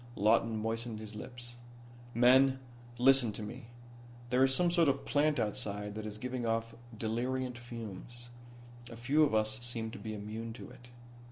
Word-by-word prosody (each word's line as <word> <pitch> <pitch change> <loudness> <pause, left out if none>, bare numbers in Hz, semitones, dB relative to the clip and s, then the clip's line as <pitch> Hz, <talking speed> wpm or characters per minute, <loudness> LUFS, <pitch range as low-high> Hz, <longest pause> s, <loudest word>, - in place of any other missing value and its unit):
Lawton 110 +2 +3
moistened 115 +1 -2
his 110 0 -8
lips. 120 +2 -9 0.6
"Men, 130 +2 +6 0.4
listen 130 -2 +5
to 110 - -6
me. 120 +3 -8 0.6
There 125 +1 +5
is 135 - +5
some 175 +6 +3
sort 170 -3 +4
of 140 0 -1
plant 150 +1 +2
outside 105 -2 -2
that 110 0 -5
is 105 0 -7
giving 125 +2 -4
off 115 0 -1 0.2
deliriant 125 +3 -2
fumes. 120 0 -8 0.6
A 115 - -9
few 135 +6 +2
of 145 -7 +4
us 110 +1 +1
seem 120 -2 -4
to - - -8
be 110 +1 -5
immune 110 +2 -6
to 120 - -10
it. 120 0 -15
120 Hz, 165 wpm, -33 LUFS, 110-130 Hz, 0.6 s, Men